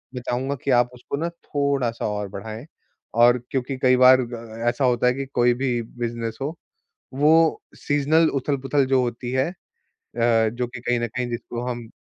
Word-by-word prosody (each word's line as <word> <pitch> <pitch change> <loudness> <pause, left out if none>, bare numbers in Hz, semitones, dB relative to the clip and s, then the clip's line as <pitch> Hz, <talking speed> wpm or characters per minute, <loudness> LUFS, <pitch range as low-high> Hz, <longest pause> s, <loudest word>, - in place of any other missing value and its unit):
मैं 125 - -4
चाहूँगा 130 +3 -1
कि 140 - 0
आप 120 0 +4
उसको 125 +3 -6
ना 170 +3 -1 0.2
थोड़ा-सा 140 -5 -1
और 105 -1 -3
बढाएँ। 110 +5 -7 0.5
और 120 +1 +6
क्योंकि 130 0 -2
कई 130 0 +5
बार 130 0 +7
ग 120 0 -6
अ, 115 0 -6
ऐसा 130 +2 0
होता 125 0 +2
है 125 - +4
कि 135 +1 -4
कोई 120 0 +4
भी 125 -1 -1 0.2
बिज़नेस 115 -1 -3
हो, 150 +5 -3 0.6
वो 155 +3 +4
सीज़नल 150 +3 +2
उथल-पुथल 140 0 0
जो 130 -1 +3
होती 120 0 -4
है 130 +4 +1
अ, - - -12 1.0
जो 125 0 -2
कि 120 0 -9
कहीं 120 -1 0
न 120 - 0
कहीं 125 +2 -3
जिसको 120 0 -5
हम 120 -2 -6
125 Hz, 185 wpm, -23 LUFS, 120-135 Hz, 1.0 s, बार